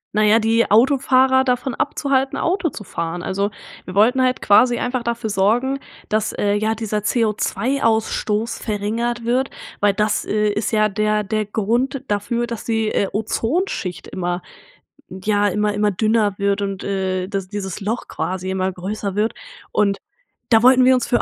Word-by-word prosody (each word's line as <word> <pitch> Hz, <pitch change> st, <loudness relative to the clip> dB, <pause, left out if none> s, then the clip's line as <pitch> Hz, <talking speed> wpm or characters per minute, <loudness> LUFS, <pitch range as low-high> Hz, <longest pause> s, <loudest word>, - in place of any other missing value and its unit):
Naja, 215 Hz, +1 st, +5 dB
die 230 Hz, +1 st, +2 dB
Autofahrer 260 Hz, +3 st, +4 dB
davon 250 Hz, 0 st, -1 dB
abzuhalten, 270 Hz, +1 st, 0 dB
Auto 355 Hz, 0 st, 0 dB
zu 230 Hz, -, -9 dB
fahren. 175 Hz, -2 st, -4 dB
Also, 200 Hz, +2 st, -1 dB, 0.4 s
wir 185 Hz, -, -8 dB
wollten 240 Hz, +6 st, +4 dB
halt 255 Hz, 0 st, +1 dB
quasi 240 Hz, +4 st, +5 dB
einfach 250 Hz, 0 st, -2 dB
dafür 235 Hz, -2 st, -3 dB
sorgen, 240 Hz, +8 st, +1 dB, 0.3 s
dass, 215 Hz, 0 st, 0 dB
äh, 205 Hz, 0 st, 0 dB
ja, 215 Hz, +2 st, 0 dB
dieser 215 Hz, -1 st, -2 dB
CO₂-Ausstoß 225 Hz, 0 st, 0 dB
verringert 230 Hz, +3 st, -2 dB
wird, 255 Hz, +3 st, +1 dB, 0.3 s
weil 205 Hz, -1 st, +3 dB
das, 210 Hz, +1 st, +1 dB
äh, 210 Hz, 0 st, +1 dB
ist 205 Hz, +1 st, -1 dB
ja 215 Hz, -1 st, +3 dB
der 215 Hz, +1 st, 0 dB
der 215 Hz, +1 st, -1 dB
Grund 240 Hz, +6 st, -1 dB
dafür, 210 Hz, +4 st, -1 dB
dass 235 Hz, -2 st, -6 dB
die, 225 Hz, -1 st, 0 dB
äh, 200 Hz, -, 0 dB
Ozonschicht 225 Hz, -, -2 dB
immer 175 Hz, -1 st, -3 dB, 0.7 s
ja 205 Hz, +2 st, 0 dB
immer 210 Hz, +2 st, 0 dB
immer 210 Hz, 0 st, +1 dB
dünner 215 Hz, 0 st, +1 dB
wird 200 Hz, 0 st, 0 dB
und, 195 Hz, -1 st, -4 dB
äh, 190 Hz, -2 st, -1 dB
dass 195 Hz, -2 st, -4 dB
dieses 200 Hz, -1 st, -5 dB
Loch 220 Hz, +4 st, -3 dB
quasi 185 Hz, 0 st, -4 dB
immer 190 Hz, 0 st, -1 dB
größer 195 Hz, +2 st, -4 dB
wird 215 Hz, +2 st, +1 dB, 0.4 s
und 200 Hz, -1 st, +2 dB, 0.5 s
da 225 Hz, -1 st, +5 dB
wollten 255 Hz, 0 st, +6 dB
wir 260 Hz, -, +6 dB
uns 250 Hz, -, 0 dB
für 245 Hz, -, +2 dB
215 Hz, 160 wpm, -20 LUFS, 200-240 Hz, 0.7 s, wollten